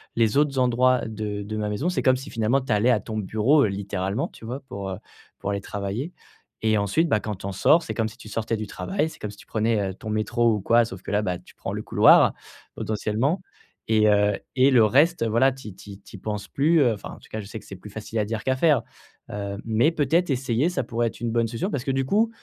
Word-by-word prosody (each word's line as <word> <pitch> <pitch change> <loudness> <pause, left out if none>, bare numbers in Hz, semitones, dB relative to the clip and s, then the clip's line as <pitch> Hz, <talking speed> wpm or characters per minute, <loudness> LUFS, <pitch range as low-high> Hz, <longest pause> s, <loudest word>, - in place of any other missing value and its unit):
les 115 -2 +2
autres 145 -2 +2
endroits 125 0 +3
de 105 -2 -4
de 110 +1 -5
ma 105 -1 -2
maison», 120 +12 -1
c'est 180 - -1
comme 130 -2 +4
si 135 +3 -9
finalement 115 +4 +1
tu 130 - -5
allais 105 +4 +3
à 115 - +3
ton 110 - -5
bureau, 110 +9 +3
heu, - - 0
littéralement, 100 +3 -2
tu - - -13
vois, 125 +5 -5
pour, 100 -1 -5
heu, 95 - -4 0.4
pour 100 - -3
aller 100 0 -2
travailler. 100 - -4 0.5
Et 110 -1 +3
ensuite, 100 - +1
bah, 110 - +3
quand 105 -1 -4
tu 95 - -11
en 100 - -4
sors, 160 - +4
c'est - - -4
comme 110 -1 0
si 110 - -15
tu 115 - -12
sortais 115 +1 -2
du 110 -1 -5
travail, 190 -5 -2
c'est - - -13
comme 105 - -5
si 105 - -14
tu - - -15
prenais, 110 0 +1
heu, - - -8
ton 110 - -8
métro 115 +2 +1
ou 105 - -1
quoi. 120 +4 +4
Sauf 95 -4 -9
que - - -8
là, 105 0 +2
bah, 90 -3 -2
tu - - -19
prends - - -5
le - - -3
couloir, - - +6 0.4
potentiellement 110 - -1 0.5
et 110 -1 +4
heu, 105 -1 +3 0.2
et 130 +1 +5
le 120 -4 +6
reste 145 +5 +3
voilà 115 +4 +3
tu 130 -4 -10
y 95 - -12
tu 105 - -14
y 100 - -10
tu 100 - -12
y - - -14
penses 105 0 -4
plus, 155 +3 +3
heu, 120 -4 +4
enfin 105 - -8
en - - -9
tout - - -19
cas, 110 - -4
je - - -10
sais 110 - -7
que - - -18
c'est 95 - -9
plus 105 - -11
facile 110 +1 -4
à 105 - +1
dire 110 +1 -4
qu'à 130 - +1
faire. 145 -4 +4 0.5
Heu, 100 -1 -4
mais 115 +7 +3
peut-être 165 +3 +1
essayer 125 +2 +1
ça 180 - -2
pourrait 120 0 -1
être - - -7
une 120 -1 -1
bonne 115 0 +1
solution. 120 - -3
Parce 130 - -2
que 135 - 0
du 135 0 0
coup, 215 - +2
110 Hz, 270 wpm, -24 LUFS, 105-130 Hz, 0.5 s, couloir